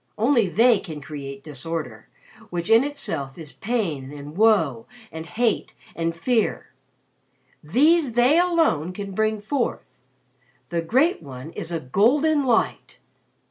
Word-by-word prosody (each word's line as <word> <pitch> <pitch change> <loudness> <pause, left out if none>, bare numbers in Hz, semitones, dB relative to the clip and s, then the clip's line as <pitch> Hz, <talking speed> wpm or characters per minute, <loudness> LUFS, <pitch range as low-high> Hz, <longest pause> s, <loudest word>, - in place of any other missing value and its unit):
Only 235 -1 +3
they 230 +4 +4
can 155 -6 -8
create 140 -2 -8
Disorder, 145 -6 -6 0.4
which 175 +3 -3
in 225 +3 +7
itself 275 - -4
is 155 -5 -9
Pain 160 - -2
and 145 +1 -9
Woe 175 - +3 0.2
and 160 0 -7
Hate 225 +4 -1 0.2
and 165 0 -2
Fear. 225 +6 -1 0.9
These 285 - +3
they 250 +7 +4
alone 325 - +2
can 200 +1 -6
bring 215 +2 0
forth. 240 +5 -3 0.7
The 170 -1 -1
Great 265 - +2
One 135 +1 -9
is 165 - -6
a 165 - -1
Golden 275 - +2
Light. 235 -3 0
195 Hz, 130 wpm, -23 LUFS, 150-245 Hz, 0.9 s, in